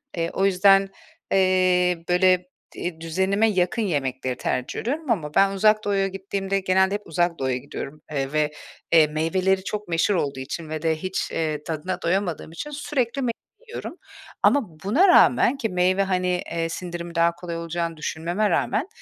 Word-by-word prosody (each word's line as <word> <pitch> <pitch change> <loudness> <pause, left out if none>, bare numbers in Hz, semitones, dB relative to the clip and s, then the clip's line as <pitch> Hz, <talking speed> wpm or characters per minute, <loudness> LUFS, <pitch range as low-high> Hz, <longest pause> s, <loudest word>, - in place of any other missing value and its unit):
Eee, 165 0 -1
o 195 - +1
yüzden, 195 0 +4 0.4
eee, 185 -2 +3
böyle 180 0 +3 0.3
di 170 -2 -5
düzenime 190 +6 +1
yakın 185 +3 0
yemekleri 130 -8 -2
tercih 125 0 -2
ediyorum 290 +3 -2
ama 155 -9 -1
ben 195 0 +5
Uzak 215 +2 +3
Doğu’ya 195 -1 +1
gittiğimde 195 0 -3
genelde 190 +1 +2
hep 205 - -4
Uzak 175 +1 0
Doğu’ya 130 -1 0
gidiyorum, 140 +3 -8
eee, 135 -2 -2
ve, 150 -1 +1 0.4
eee, 160 -2 +6
meyveleri 185 +5 0
çok 210 0 -4
meşhur 170 +4 +1
olduğu 140 -5 -1
için 155 +4 -6
ve 155 -1 -4
de 160 -1 +1
hiç, 185 +4 -3
eee, 155 -2 -2
tadına 160 +3 -4
doyamadığım 175 -2 -1
için 170 - -6
sürekli 275 -3 -2
meyve 240 -2 0 0.4
yiyorum. 450 -5 -7 0.5
Ama 280 -5 +4 0.2
buna 270 - +4
rağmen 270 -6 +5
ki 230 -5 -2
meyve, 185 +1 +2
hani, 180 -2 0
eee, 165 -1 -1
sindirimi 170 0 -6
daha 170 0 +4
kolay 170 -1 -6
olacağını 170 0 -3
düşünmeme 175 +7 -1
rağmen, 285 - 0
180 Hz, 165 wpm, -24 LUFS, 165-195 Hz, 0.5 s, eee